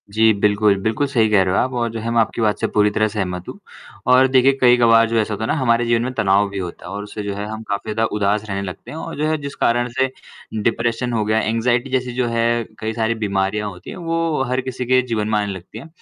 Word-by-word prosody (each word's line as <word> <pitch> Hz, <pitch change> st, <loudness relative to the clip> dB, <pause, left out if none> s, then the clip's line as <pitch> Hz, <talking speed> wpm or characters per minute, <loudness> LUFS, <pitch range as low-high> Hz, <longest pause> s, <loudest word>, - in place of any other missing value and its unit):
जी, 110 Hz, +2 st, +4 dB
बिल्कुल। 105 Hz, 0 st, +2 dB
बिल्कुल 110 Hz, +8 st, 0 dB
सही 115 Hz, -5 st, +2 dB
कह 105 Hz, -2 st, +4 dB
रहे 95 Hz, 0 st, 0 dB
हो -, -, +2 dB
आप 130 Hz, +1 st, -2 dB
और 120 Hz, -1 st, 0 dB
जो 115 Hz, -, -5 dB
है 115 Hz, +1 st, -4 dB
मैं 115 Hz, -, +2 dB
आपकी 115 Hz, -, -2 dB
बात 105 Hz, -2 st, +1 dB
से -, -, 0 dB
पूरी 105 Hz, 0 st, +2 dB
तरह 110 Hz, +1 st, +1 dB
सहमत 90 Hz, -4 st, -4 dB
हूँ -, -, -9 dB, 0.5 s
और 130 Hz, +1 st, +6 dB
देखिए, 130 Hz, +1 st, +4 dB
कई 125 Hz, -1 st, +6 dB
कबार 115 Hz, -1 st, +5 dB
जो 115 Hz, -, 0 dB
ऐसा 110 Hz, 0 st, -1 dB
होता 105 Hz, -, -4 dB
है -, -, -1 dB
ना -, -, +1 dB
हमारे 120 Hz, -2 st, +2 dB
जीवन 115 Hz, 0 st, +2 dB
में 130 Hz, -, -2 dB
तनाव 100 Hz, -4 st, +2 dB
भी 100 Hz, -, -7 dB
होता 90 Hz, -2 st, -7 dB
है 90 Hz, -, -7 dB
और 100 Hz, +1 st, -4 dB
उससे 105 Hz, 0 st, -7 dB
जो 100 Hz, 0 st, -3 dB
है 100 Hz, +1 st, -4 dB
हम 110 Hz, +1 st, -6 dB
काफ़ी 100 Hz, +2 st, -3 dB
ज़्यादा 110 Hz, +1 st, +1 dB
उदास 105 Hz, +1 st, 0 dB
रहने 100 Hz, 0 st, -2 dB
लगते 90 Hz, -2 st, -8 dB
हैं 155 Hz, -, -7 dB
और -, -, -6 dB
जो 150 Hz, +1 st, 0 dB
है 155 Hz, -, +1 dB
जिस 140 Hz, 0 st, -6 dB
कारण 120 Hz, +1 st, +1 dB
से 130 Hz, 0 st, +3 dB, 0.5 s
डिप्रेशन 115 Hz, +2 st, 0 dB
हो 110 Hz, -2 st, +1 dB
गया, 110 Hz, +1 st, +2 dB
एंग्जायटी 120 Hz, +4 st, 0 dB
जैसी 125 Hz, -1 st, -1 dB
जो 125 Hz, -1 st, 0 dB
है 115 Hz, 0 st, +1 dB, 0.2 s
कई 110 Hz, +1 st, -3 dB
सारी 115 Hz, 0 st, 0 dB
बीमारियाँ 100 Hz, +1 st, -1 dB
होती 90 Hz, -2 st, -11 dB
हैं, -, -, -7 dB
वो 165 Hz, -4 st, -1 dB
हर 130 Hz, +1 st, 0 dB
किसी 130 Hz, -1 st, -5 dB
के 130 Hz, +1 st, +4 dB
जीवन 115 Hz, -4 st, -2 dB
में 110 Hz, -, +2 dB
आने 105 Hz, -1 st, -2 dB
लगती 95 Hz, -1 st, -10 dB
है -, -, -11 dB
115 Hz, 275 wpm, -20 LUFS, 105-125 Hz, 0.5 s, और